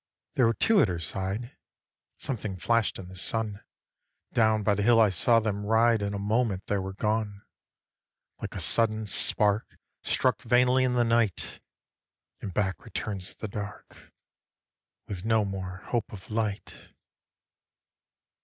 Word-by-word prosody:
There 125 - +4
were 115 - +1
two 220 -3 +4
at - - +4
her 90 -2 -2
side, 95 - -4 0.6
Something 110 -7 -4
flash' 115 +3 +2
d - - -9
in - - -11
the 95 - -11
sun, 105 +2 -1 0.7
Down 110 -2 +3
by 105 0 +3
the 100 - -1
hill 115 +2 +5
I 110 -2 +6
saw 115 +6 +3
them 105 -2 -2
ride, 110 +1 +3
In 100 0 -2
a - - -2
moment 105 -1 0
they 100 - 0
were 95 0 -5
gone: 105 -1 -1 1.0
Like - - -6
a - - -3
sudden 110 -1 +2
spark 105 +1 0 0.2
Struck - - +1
vainly 125 +1 +3
in 125 -1 0
the 120 - +4
night, 115 -4 0 0.8
And 100 - -5
back 95 -3 -1
returns 100 -4 -3
the 110 - -6
dark 105 0 -8 1.0
With 95 -3 -5
no 110 -1 +2
more 95 -1 -6
hope 120 -3 -1
of 100 0 -11
light. 110 -2 -4
105 Hz, 150 wpm, -28 LUFS, 100-115 Hz, 1.0 s, I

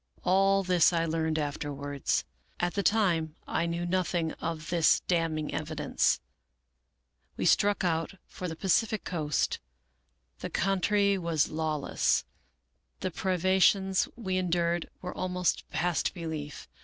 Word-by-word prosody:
All 195 +1 +3
this 180 -2 +4
I 165 -1 +1
learned 160 -1 0
afterwards. 145 -1 -2 0.3
At 175 0 0
the 200 - 0
time 175 -8 +2
I 170 - 0
knew 170 +1 -2
nothing 175 -2 0
of 165 -1 -4
this 170 -3 +4
damning 165 -3 -1
evidence. 155 -2 0 0.6
" - - -46
We - - -1
struck 205 -1 +3
out 165 -2 0
together 195 - -16
for 180 - -6
the 160 - -5
Pacific 205 +4 +1
coast. 150 -5 -1 0.8
The - - -5
coun 195 0 0
try 200 -1 +3
was 165 -4 0
lawless. 155 -2 0 0.8
The 185 - -2
privations 190 +2 +2
we 190 -6 -2
endured 175 -1 0
were 180 - -5
almost 180 -1 -1
past 175 +3 0
belief. 160 -4 -6
170 Hz, 130 wpm, -29 LUFS, 160-185 Hz, 0.8 s, this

